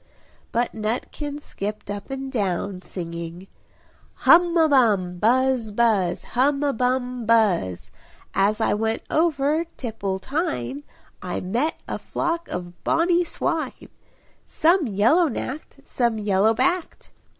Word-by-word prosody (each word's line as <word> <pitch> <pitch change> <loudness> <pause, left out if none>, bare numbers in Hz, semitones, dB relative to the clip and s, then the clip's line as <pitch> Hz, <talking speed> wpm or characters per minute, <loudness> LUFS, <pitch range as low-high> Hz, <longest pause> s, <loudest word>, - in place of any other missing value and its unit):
But 240 0 0
Nutkin 250 +7 -3
skipped 205 0 -5
up 205 +4 -6
and 270 0 -5
down, 195 -4 -2
singing 170 0 -7 0.8
"Hum 345 0 +6
a 320 -1 +5
bum! 205 - +2
buzz! 250 0 +2
buzz! 205 -5 +1
Hum 275 +3 +1
a 285 -1 +1
bum 250 -1 -1
buzz! 195 - +2 0.4
As 205 +3 +2
I 220 - +2
went 220 +2 -1
over 310 0 +2
Tipple 210 -6 -3
tine 190 - -3 0.4
I 180 - -3
met 235 +12 -1
a - - -4
flock 335 +1 -2
of 175 -1 -7
bonny 340 +2 +3
swine; 325 -5 -3 0.6
Some 330 -1 +3
yellow 230 - +3
nacked, 275 +3 -6
some 235 -3 0
yellow 210 +1 +2
backed! 330 +9 -1
235 Hz, 120 wpm, -23 LUFS, 200-290 Hz, 0.8 s, Hum